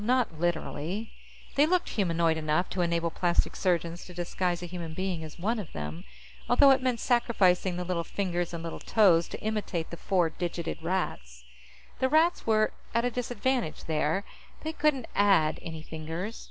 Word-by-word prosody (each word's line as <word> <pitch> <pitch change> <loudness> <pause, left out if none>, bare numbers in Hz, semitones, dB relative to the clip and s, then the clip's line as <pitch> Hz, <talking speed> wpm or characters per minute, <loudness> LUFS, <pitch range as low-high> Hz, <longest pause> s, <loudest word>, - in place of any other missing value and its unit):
Not 240 -8 +1
literally. 175 +4 -2 0.4
They 290 +2 +4
looked 360 +1 +1
humanoid 170 -5 +1
enough 155 +3 0
to 185 - -1
enable 170 -1 +1
plastic 175 +1 +1
surgeons 170 -2 0
to 180 - -11
disguise 175 0 -1
a - - -3
human 170 -2 -6
being 185 -3 -2
as 155 -1 -9
one 220 +6 0
of 195 - -7
them, 75 +3 -6 0.4
although 275 +3 +7
it 265 -1 +4
meant 255 -2 0
sacrificing 190 -7 +2
the 180 - -2
little 175 -1 -1
fingers 175 -2 -2
and 170 -1 -5
little 165 - -5
toes 180 -7 +4
to - - -7
imitate 210 -6 -2
the 170 - -6
four 175 -4 +1
digited 170 -2 -4
Rats. 60 - -3 0.6
The 260 - +2
Rats 320 +2 +3
were 215 -1 +3 0.2
at 230 +1 +3
a 245 - +1
disadvantage 245 -4 -1
there; 160 +4 0 0.4
they 315 +1 -3
couldn't 290 -5 +1
add 190 -7 +3
any 160 -2 -7
fingers. 160 +8 -5
180 Hz, 170 wpm, -29 LUFS, 165-225 Hz, 0.6 s, although